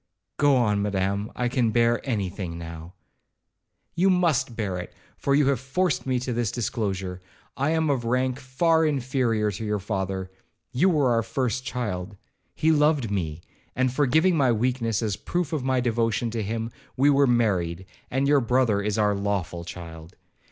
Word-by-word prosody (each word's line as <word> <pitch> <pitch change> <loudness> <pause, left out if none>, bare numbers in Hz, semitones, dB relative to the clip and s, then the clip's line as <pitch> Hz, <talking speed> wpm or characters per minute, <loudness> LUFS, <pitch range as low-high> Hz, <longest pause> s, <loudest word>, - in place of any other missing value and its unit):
'Go 145 -1 +4
on, 105 -5 +2
Madam, 100 +1 -1
I 125 - 0
can 120 -2 +1
bear 120 +1 +2
any 110 -8 -1
thing 90 -3 -6
now.' 85 +1 -8 1.0
'You 185 +3 +3
must 160 -10 +2
bear 95 -5 -2
it, 90 - -7 0.2
for 140 - +1
you 145 0 +4
have 135 -4 +1
forced 145 +5 -1
me 130 -1 +1
to 125 -1 -2
this 115 -3 -1
disclosure. 95 -6 -3 0.3
I 140 +2 0
am 160 0 +1
of 130 -4 -1
rank 125 +2 0
far 160 +5 +2
inferior 130 -7 +1
to 100 - -6
your 105 -1 0
father,—you 95 - -3
were 145 -7 +2
our 115 -1 +3
first 125 +1 -2
child. 105 -6 -4 0.4
He 160 - +2
loved 150 -7 +2
me, 85 -5 -2 0.3
and 130 -1 +1
forgiving 155 +6 +3
my 135 -5 +3
weakness 115 -1 0
as 105 -2 0
a - - -6
proof 175 -3 -2
of 150 -5 -1
my 130 -1 +1
devotion 115 -2 0
to 115 0 -2
him, 115 +2 -3 0.3
we 140 +3 +5
were 140 0 +4
married, 95 -7 +1 0.2
and 135 +2 0
your 145 -1 +4
brother 120 -4 +2
is 105 0 -1
our 105 -1 +3
lawful 100 -4 -2
child. 85 -1 -9
120 Hz, 175 wpm, -25 LUFS, 100-135 Hz, 1.0 s, we